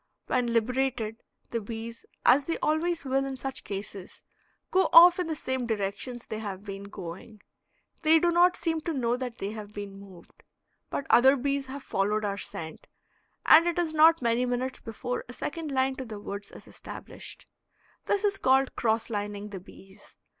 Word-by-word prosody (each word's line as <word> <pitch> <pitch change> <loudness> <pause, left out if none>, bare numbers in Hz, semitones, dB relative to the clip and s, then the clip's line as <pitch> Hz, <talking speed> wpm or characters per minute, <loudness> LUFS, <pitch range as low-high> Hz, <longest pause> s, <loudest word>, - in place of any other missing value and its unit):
When 250 -1 0
liberated, 235 -1 0 0.3
the 230 - -1
bees, 230 +2 -7 0.2
as 275 +2 +6
they 330 - -1
always 320 +1 0
will 270 +1 +1
in 270 -1 -4
such 265 -2 -5
cases, 195 -1 -7 0.5
go 380 +1 +3
off 350 +2 +9
in 360 - -1
the 320 - -2
same 260 -4 -3
directions 220 +3 -3
they 215 - -5
have 200 -2 -6
been 200 -1 -7
going; 200 +3 -9 0.6
they 320 0 +6
do 345 +2 +3
not 355 +1 +4
seem 325 -2 -1
to 330 - -3
know 240 -4 0
that 250 -2 -5
they 200 - -4
have 210 -1 -8
been 200 -1 -7
moved. 190 -3 -15 0.5
But 280 - -3
other 265 +3 +7
bees 275 +1 -1
have 270 +1 -7
followed 210 +2 0
our 200 0 -2
scent, 160 -5 -7 0.6
and 330 +2 +8
it 345 - 0
is 335 -3 0
not 320 -1 +6
many 235 +1 +2
minutes 250 +1 -2
before 245 +3 -4
a - - -7
second 310 +3 -4
line 265 0 +1
to 260 - -5
the 215 -3 -7
woods 200 0 -7
is - - -13
established. - - -10 0.6
This 405 0 +1
is 400 -1 +1
called 265 +1 +3
cross 225 -1 +1
lining 205 0 -4
the 195 -2 -7
bees. 195 +2 -17
245 Hz, 180 wpm, -28 LUFS, 210-280 Hz, 0.6 s, off